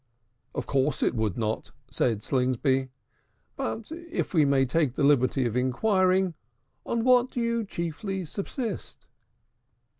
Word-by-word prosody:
"Of - - -2
course 140 +2 +1
it - - +1
could 110 -5 -1
not," 110 -1 -2 0.2
said 110 -4 0
Slingsby. 130 +1 +1 0.7
"But, 215 - -4
if 335 -5 -4
we 155 -4 +5
may 140 -1 +3
take 135 -1 +1
the 150 - 0
liberty 135 -2 +3
of 115 -1 -1
inquiring, 185 - +2 0.5
on 230 -1 0
what 250 0 +5
do 250 - -4
you 235 -1 0
chiefly 185 +2 -4
subsist?" 215 - -5
150 Hz, 130 wpm, -27 LUFS, 130-210 Hz, 0.7 s, we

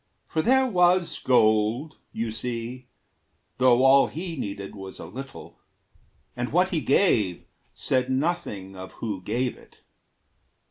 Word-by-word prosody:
For 160 - -1
there 265 +7 +4
was 180 -5 +2
gold, 115 +4 +2
You 115 0 -3
see, 120 +2 -5 0.7
though 125 0 +5
all 135 +1 +6
he 170 +1 -6
needed 100 -6 -5
was 95 -1 -9
a - - -8
little, 135 +9 -10 0.8
And 120 0 -3
what 180 +4 +3
he 165 -4 -1
gave 115 - +2 0.3
said 130 -1 0
nothing 130 - -2
of 95 0 -9
who 105 -5 -5
gave 120 +6 -2
it. - - -21
125 Hz, 130 wpm, -25 LUFS, 110-160 Hz, 0.8 s, all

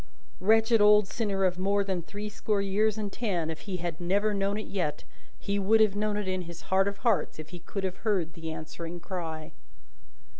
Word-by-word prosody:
Wretched 225 +2 +4
old 210 -1 +6
sinner 200 -4 0
of 180 0 0
more 200 +2 +2
than 190 -3 -2
threescore 210 +3 -3
years 205 +2 +1
and 205 -2 -3
ten, 175 -9 -1
if 160 - -6
he 185 - -1
had 170 -1 -4
never 200 +4 +2
known 200 +1 0
it 215 - -4
yet, 180 -7 -2 0.3
he 200 0 -1
would 215 +3 +4
have 215 -2 +4
known 210 0 0
it 210 -2 -2
in 185 0 -1
his 170 -1 -8
heart 195 +1 +4
of 200 0 -3
hearts 210 -10 +2
if 155 0 -8
he 175 - -8
could 195 +3 -5
have 190 -1 -2
heard 185 -7 0
the 165 -1 -6
answering 165 +2 -6
cry. 165 -3 -5
195 Hz, 200 wpm, -29 LUFS, 175-210 Hz, 0.3 s, old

